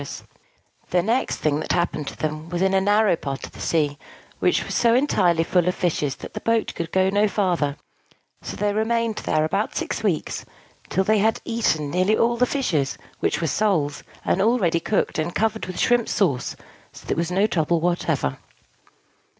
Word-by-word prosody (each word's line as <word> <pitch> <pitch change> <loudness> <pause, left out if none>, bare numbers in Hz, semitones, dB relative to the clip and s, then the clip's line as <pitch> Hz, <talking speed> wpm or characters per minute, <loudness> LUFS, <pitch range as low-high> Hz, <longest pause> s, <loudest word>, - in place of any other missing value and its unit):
The 175 -1 +2
next 235 +6 +1
thing 150 -1 0
that 155 - -1
happened 170 -4 -1
to - - -5
them 155 +1 -4
was 175 +1 -1
in 190 0 +2
a 190 - +4
narrow 205 -1 +3
part 140 -4 -5
of - - -12
the - - -14
sea, 150 -3 0 0.4
which - - +2
was - - -5
so 235 -1 +3
entirely 180 - +3
full 180 +1 +1
of 180 - +1
fishes 150 -5 -1
that - - -10
the - - -4
boat 230 -1 0
could 165 - -5
go 190 0 +3
on 190 - 0
no 205 +1 +4
farther: 175 -9 0 0.6
so - - -6
they 205 0 0
remained 225 +1 0
there 155 0 +1
about 155 - -1
six - - -2
weeks, - - -1 0.5
till 190 - +1
they 215 +2 +3
had 220 +2 +2
eaten 160 -11 0
nearly 185 +5 +2
all 235 +1 +2
the 250 +1 +2
fishes, 165 - 0 0.2
which - - 0
were - - 0
soles, 160 -5 0 0.2
and 190 - +2
all 230 +5 +3
ready 170 -6 +1
cooked, 190 -1 -1
and 165 +2 -2
covered 220 -1 0
with 185 -1 -6
shrimp 240 -2 +2
sauce, 140 -11 0 0.4
so - - -13
that - - -17
there - - +1
was 170 0 0
no 190 +3 +2
trouble 170 -4 +1
whatever. 160 - -1
180 Hz, 200 wpm, -23 LUFS, 160-215 Hz, 0.6 s, a